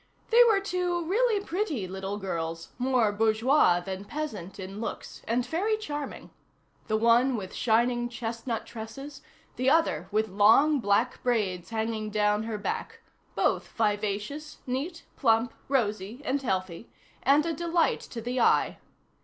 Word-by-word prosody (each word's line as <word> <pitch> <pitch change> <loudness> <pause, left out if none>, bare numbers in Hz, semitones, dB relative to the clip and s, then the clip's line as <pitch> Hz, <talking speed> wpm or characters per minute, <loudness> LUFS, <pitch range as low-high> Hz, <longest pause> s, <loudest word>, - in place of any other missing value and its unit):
They 475 +2 +8
were 435 -4 +4
two 360 -3 -1
really 420 +2 +1
pretty 325 - -2
little 190 +2 -4
girls, 165 -4 -4
more 250 -4 +2
bourgeois 220 -1 +3
than 190 +2 -5
peasant 205 - -5
in 195 +3 -6
looks, 230 - -6
and 240 +2 +1
very 405 +9 0
charming; 295 -9 -6 0.6
the 215 -1 +1
one 235 +3 +4
with 190 -3 -6
shining 240 +1 +1
chestnut 230 0 -4
tresses, 240 +6 -8 0.4
the 255 +1 +2
other 280 - +2
with 215 +1 +1
long 225 +10 +5
black 225 +3 +1
braids 200 -8 0
hanging 220 -1 -2
down 210 0 +1
her 225 -2 -3
back, 205 - -4 0.3
both - - +1
vivacious, 210 +7 -2
neat, 290 +7 -4
plump, 230 -2 +2
rosy, 220 -1 -1
and 275 +2 0
healthy, 185 -4 -3 0.3
and 285 +4 +4
a 335 - -1
delight 340 +1 +1
to 230 - -7
the 245 +2 -2
eye. - - +3
230 Hz, 140 wpm, -28 LUFS, 210-290 Hz, 0.6 s, They